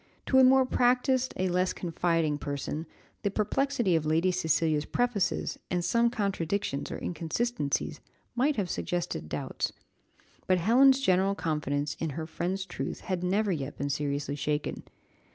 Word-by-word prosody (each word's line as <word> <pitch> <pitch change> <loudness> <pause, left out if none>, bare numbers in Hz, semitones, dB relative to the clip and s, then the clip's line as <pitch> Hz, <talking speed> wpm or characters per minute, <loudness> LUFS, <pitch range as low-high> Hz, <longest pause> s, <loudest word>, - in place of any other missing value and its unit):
To 265 - +4
a - - +8
more 260 0 +6
practised, 255 +1 +2
a 185 - +1
less 180 +1 +1
confiding, 165 -3 0
person 145 +3 -4 0.3
the 200 - +1
perplexity 215 -1 +1
of 160 - +1
Lady 160 +4 +2
Cecilia's 160 -3 +1
prefaces, 230 -1 -1
and 175 -1 -1
some 235 0 +3
contradictions 200 - -2
or - - -4
inconsistencies, 165 0 -2 0.4
might 275 +5 +2
have 200 -4 -1
suggested 175 - -3
doubts; - - -3 0.8
but 185 - +4
Helen's 260 +9 +5
general 190 -3 +3
confidence 150 -4 -1
in 160 - -1
her 160 - -3
friend's 185 +4 -3
truth 175 - -5
had 185 -2 -3
never 200 +3 +1
yet 145 -4 -3
been 140 0 -2
seriously 145 0 -2
shaken. 150 +1 -2
180 Hz, 145 wpm, -29 LUFS, 155-230 Hz, 0.8 s, a